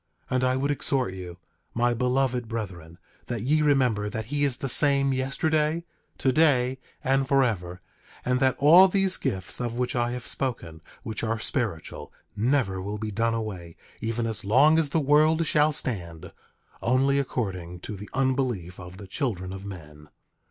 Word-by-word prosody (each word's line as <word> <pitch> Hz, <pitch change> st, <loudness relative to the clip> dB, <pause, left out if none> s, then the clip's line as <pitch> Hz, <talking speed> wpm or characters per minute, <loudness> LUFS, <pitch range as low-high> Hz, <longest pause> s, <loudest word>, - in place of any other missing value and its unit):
10:19 -, -, +1 dB
And 130 Hz, -, +1 dB
I 130 Hz, 0 st, +2 dB
would 140 Hz, +2 st, 0 dB
exhort 135 Hz, -7 st, -1 dB
you, 90 Hz, -2 st, -8 dB, 0.4 s
my 120 Hz, +1 st, +2 dB
beloved 125 Hz, 0 st, 0 dB
brethren, 90 Hz, -8 st, -6 dB, 0.3 s
that 120 Hz, -3 st, -3 dB
ye 150 Hz, +5 st, +2 dB
remember 125 Hz, -8 st, +2 dB
that 110 Hz, +1 st, -4 dB
he 145 Hz, +5 st, -1 dB
is 135 Hz, -4 st, +1 dB
the 135 Hz, -, -4 dB
same 140 Hz, +1 st, +3 dB
yesterday, 150 Hz, +5 st, 0 dB, 0.3 s
today, 130 Hz, -2 st, +2 dB, 0.2 s
and 135 Hz, -1 st, +1 dB
forever, 105 Hz, -10 st, 0 dB, 0.4 s
and 125 Hz, 0 st, +1 dB
that 130 Hz, -1 st, +2 dB
all 170 Hz, +7 st, +8 dB
these 195 Hz, 0 st, +2 dB
gifts 95 Hz, +3 st, -3 dB
of 120 Hz, -1 st, -3 dB
which 125 Hz, +1 st, -1 dB
I 120 Hz, 0 st, +1 dB
have 125 Hz, 0 st, -6 dB
spoken, 85 Hz, -12 st, -3 dB, 0.2 s
which 110 Hz, -1 st, -4 dB
are 115 Hz, 0 st, 0 dB
spiritual, 110 Hz, -, -2 dB, 0.2 s
never 110 Hz, -4 st, +1 dB
will 100 Hz, +3 st, -4 dB
be 110 Hz, 0 st, -4 dB
done 115 Hz, +2 st, 0 dB
away, 95 Hz, -7 st, -5 dB, 0.3 s
even 115 Hz, +1 st, -2 dB
as 110 Hz, -2 st, -3 dB
long 140 Hz, +10 st, +5 dB
as 155 Hz, -3 st, +1 dB
the 160 Hz, -, +1 dB
world 155 Hz, +3 st, +3 dB
shall 150 Hz, 0 st, +3 dB
stand, 85 Hz, -, -3 dB, 0.5 s
only 135 Hz, +3 st, +2 dB
according 90 Hz, -10 st, -4 dB
to 105 Hz, -, -6 dB
the 100 Hz, +1 st, -9 dB
unbelief 125 Hz, -9 st, -1 dB
of 90 Hz, 0 st, -10 dB
the 100 Hz, -, -9 dB
children 95 Hz, -, -3 dB
of 95 Hz, 0 st, -8 dB
men. 75 Hz, -5 st, -11 dB
125 Hz, 165 wpm, -26 LUFS, 100-135 Hz, 0.5 s, all